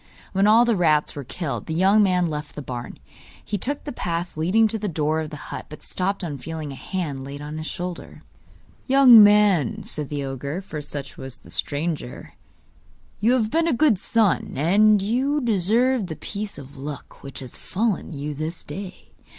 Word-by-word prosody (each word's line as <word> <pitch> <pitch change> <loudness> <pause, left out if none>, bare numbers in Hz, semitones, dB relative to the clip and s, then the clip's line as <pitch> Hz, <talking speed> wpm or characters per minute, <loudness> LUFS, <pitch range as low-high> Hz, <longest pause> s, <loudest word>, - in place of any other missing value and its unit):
When 195 +1 +3
all 225 +3 +6
the 235 -2 +2
rats 155 -5 +2
were 145 - -5
killed, 135 - -5
the 160 - -2
young 195 +5 +5
man 180 -3 +3
left 150 -1 -5
the 150 - -6
barn. 125 -2 -6 0.5
He 205 - -2
took 285 +8 -3
the 290 - -5
path 175 -5 -3
leading 185 +8 +3
to 220 - -2
the 210 - -2
door 155 -2 0
of 155 -1 -4
the 150 - -8 0.2
hut, - - -6
but 150 - -11
stopped 195 +1 -2
on 145 -5 -4
feeling 155 +1 -6
a - - -7
hand 145 -4 -4
laid 140 +1 -7
on 150 +2 -6
his 155 - -5
shoulder. 180 0 -6 0.6
'Young 260 -4 +9
man,' 210 0 +4
said 150 -5 -6
the 145 -1 -3
ogre 140 +5 -4
(for 175 -6 -6
such 140 -1 -7
was 130 -1 -7
the - - -14
stranger), 150 -3 -3 0.9
'you 230 +4 +3
have 225 -4 +1
been 330 +1 +2
a 330 - +2
good 245 -6 +3
son, 220 -3 +1
and 200 +8 +4
you 260 +8 +1
deserve 230 +1 +2
the 160 - -5
piece 205 +4 -5
of 140 0 -11
luck 140 +1 -8
which 135 -2 -9
has 130 -3 -8
befallen 210 -1 -2
you 150 0 -4
this 155 +4 -5
day. 185 +5 -9
175 Hz, 190 wpm, -23 LUFS, 150-215 Hz, 0.9 s, Young